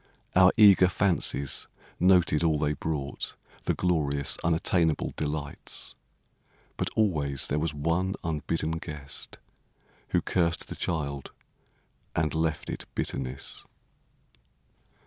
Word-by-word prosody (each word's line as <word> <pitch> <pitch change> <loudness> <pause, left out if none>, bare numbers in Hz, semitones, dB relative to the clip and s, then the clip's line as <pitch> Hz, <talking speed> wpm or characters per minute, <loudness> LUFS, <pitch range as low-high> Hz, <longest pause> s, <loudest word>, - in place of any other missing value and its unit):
Our 90 0 +7
eager 100 -4 +8
fancies 85 -7 0 0.3
noted 90 -4 +4
all 80 -2 +3
they 75 0 +1
brought, 75 -1 -3 0.3
The - - +1
glorious, 75 -6 +1
unattainable 80 -1 +1
delights! 75 -1 -4 0.8
But - - -1
always 75 -11 +1
there 75 - 0
was 75 -1 -1
one 85 +6 0
unbidden 80 0 -1
guest 70 -4 -7 0.7
Who - - +3
cursed 85 -2 +1
the - - -5
child 70 -5 -2 0.9
and 80 -2 +1
left 80 -1 -1
it - - -5
bitterness. 65 +1 -3
80 Hz, 105 wpm, -28 LUFS, 75-85 Hz, 0.9 s, eager